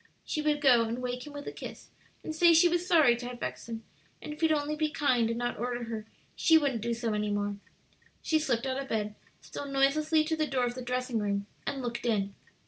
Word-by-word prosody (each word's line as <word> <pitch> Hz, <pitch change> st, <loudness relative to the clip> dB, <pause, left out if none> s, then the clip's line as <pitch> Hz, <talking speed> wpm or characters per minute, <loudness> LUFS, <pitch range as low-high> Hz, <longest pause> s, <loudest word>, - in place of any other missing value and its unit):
She 305 Hz, -, -2 dB
would 300 Hz, -1 st, +1 dB
go 250 Hz, -5 st, +6 dB
and 230 Hz, +2 st, -3 dB
wake 250 Hz, +1 st, -4 dB
him 295 Hz, -, -9 dB
with 285 Hz, 0 st, -7 dB
a -, -, -3 dB
kiss, -, -, -9 dB, 0.3 s
and 315 Hz, -, -4 dB
say 340 Hz, +1 st, +6 dB
she 340 Hz, +2 st, +7 dB
was 350 Hz, +1 st, 0 dB
sorry 310 Hz, -9 st, +6 dB
to 245 Hz, 0 st, -6 dB
have 245 Hz, -1 st, -7 dB
vexed 125 Hz, -, -5 dB
him, 225 Hz, -1 st, -5 dB, 0.4 s
and 300 Hz, -, -6 dB
if 300 Hz, -, -12 dB
he'd 320 Hz, -1 st, +4 dB
only 300 Hz, 0 st, 0 dB
be 310 Hz, 0 st, 0 dB
kind 255 Hz, -7 st, +2 dB
and 230 Hz, -, -1 dB
not 240 Hz, 0 st, -2 dB
order 245 Hz, 0 st, -2 dB
her, 220 Hz, -2 st, -5 dB, 0.3 s
she 325 Hz, -, +5 dB
wouldn't 275 Hz, -7 st, 0 dB
do 235 Hz, +1 st, -1 dB
so 230 Hz, -2 st, -2 dB
any 210 Hz, 0 st, -1 dB
more. 205 Hz, 0 st, -1 dB, 0.7 s
She 315 Hz, -, +2 dB
slipped 260 Hz, -5 st, 0 dB
out 265 Hz, +1 st, -1 dB
of 270 Hz, -, -8 dB
bed, 210 Hz, -1 st, -1 dB, 0.3 s
stole 285 Hz, -, -7 dB
noiselessly 300 Hz, +3 st, +3 dB
to 320 Hz, +1 st, -1 dB
the 310 Hz, -1 st, 0 dB
door 255 Hz, -3 st, +1 dB
of 240 Hz, -, -2 dB
the 255 Hz, -, -6 dB
dressing 250 Hz, -1 st, -1 dB
room, 200 Hz, -1 st, -1 dB, 0.2 s
and 275 Hz, -2 st, -2 dB
looked 240 Hz, 0 st, -3 dB
in. 200 Hz, -3 st, 0 dB
250 Hz, 240 wpm, -30 LUFS, 230-300 Hz, 0.7 s, she